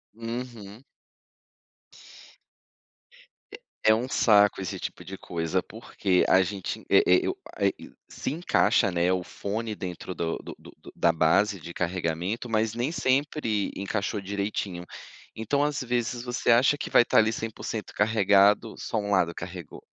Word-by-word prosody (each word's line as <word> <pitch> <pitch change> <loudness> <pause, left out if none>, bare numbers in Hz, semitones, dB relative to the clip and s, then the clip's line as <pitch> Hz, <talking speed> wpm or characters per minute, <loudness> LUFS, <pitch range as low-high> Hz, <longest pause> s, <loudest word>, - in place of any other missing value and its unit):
Uhum. 115 -1 -7 2.7
É - - -7 0.3
é 110 - +8
um 120 +4 -1
saco 105 -5 +4
esse 95 - -4
tipo - - -7
de 95 - -7
coisa, 85 +1 -2
porque 100 -4 -1
a 95 - +5
gente 95 0 -4
e - - +6
e 90 - +4
o - - -4 0.2
a - - 0 0.4
se - - -4
encaixa, 120 - +2
né, 90 +1 +1
o 90 -1 -1
fone 110 +4 -4
dentro 90 0 -6
do 80 -1 -2
do - - -9
do - - -15
da 85 - +3
base 95 +5 +2
de 85 - -9
carregamento, 90 +6 -2
mas 110 0 +1
nem 120 +6 -2
sempre 130 - 0
encaixou 100 +1 -2
direitinho. 100 -2 -3 0.5
Então 140 +6 0
às 150 -2 -1
vezes 120 0 -2
você 125 -1 -2
acha 130 +5 +4
que - - -4
vai 120 - +6
estar - - +3
ali 110 +1 +3
100% 110 0 -5
carregado, 105 0 +3
só 115 - -3
um 100 -1 -2
lado 90 -3 +2
carregou. 85 -2 -8
105 Hz, 150 wpm, -26 LUFS, 95-115 Hz, 2.7 s, é